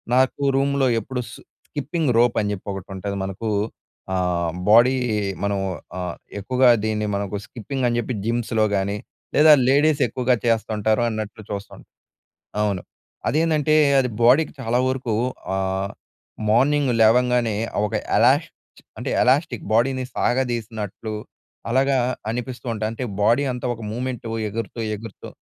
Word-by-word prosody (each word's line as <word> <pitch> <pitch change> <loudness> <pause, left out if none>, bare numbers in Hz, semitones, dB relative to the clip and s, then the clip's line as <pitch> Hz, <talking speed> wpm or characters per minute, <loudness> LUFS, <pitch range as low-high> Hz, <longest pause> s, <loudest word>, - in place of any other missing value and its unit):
నాకు 130 +2 +2 0.2
రూమ్‌లో 140 -1 +2
ఎప్పుడు 125 +3 -4
సు - - -11 0.3
స్కిప్పింగ్ 150 0 -1
రోప్ 120 0 +4
అని 105 -1 0
చెప్పి 100 - -9
ఒకటి 95 0 -8
ఉంటది. 100 +1 -4
మనకు 95 +4 -5 0.7
ఆహ్, 90 -2 0 0.2
బాడీ 120 +4 +6 0.5
మనం 100 -1 0 0.4
ఆహ్, 90 -2 -4 0.2
ఎక్కువగా 125 +4 +3 0.2
దీన్ని 105 -1 -1
మనకు 100 0 -3
స్కిప్పింగ్ 125 +3 -4
అని 120 - 0
చెప్పి 120 +2 -3
జిమ్స్‌లో 115 -2 +1
కానీ 100 +1 -1 0.4
లేదా 155 +1 +7 0.2
లేడీస్ 145 +2 +3
ఎక్కువగా 125 +2 +1
చేస్తుంటారు 110 -1 +1
అన్నట్లు 110 -1 -5
చూస్తాం. 100 0 -6 0.8
అవును. 100 -4 0 0.5
అదేందంటే 155 -1 +2 0.2
అది 125 -1 +2
బాడీకి 130 +7 +5
చాలా 120 0 0
వరకు 130 -4 -1 0.4
ఆహ్, 95 +1 -1 0.6
మార్నింగ్ 135 +3 +3
లేవంగానే 120 -1 +4 0.3
ఒక 110 - -6 0.2
ఎలాష్ 130 +8 +4 0.5
అంటే - - -3
ఎలాష్టిక్ 130 -1 +2
బాడీని 130 +3 +2
సాగదీసినట్లు 115 -4 -2 0.6
అలాగా 135 +2 +3 0.3
అనిపిస్తూ 125 +1 -5
ఉంటాయి. 110 0 -2
అంటే 125 +3 -4 0.2
బాడీ 120 +7 +4
అంతా 125 0 -4
ఒక 115 - -11
మూవ్మెంట్ 125 +1 -4 0.3
ఎగురుతూ 115 +2 -5
ఎగురుతూ 110 0 -9
120 Hz, 125 wpm, -22 LUFS, 105-130 Hz, 0.8 s, లేదా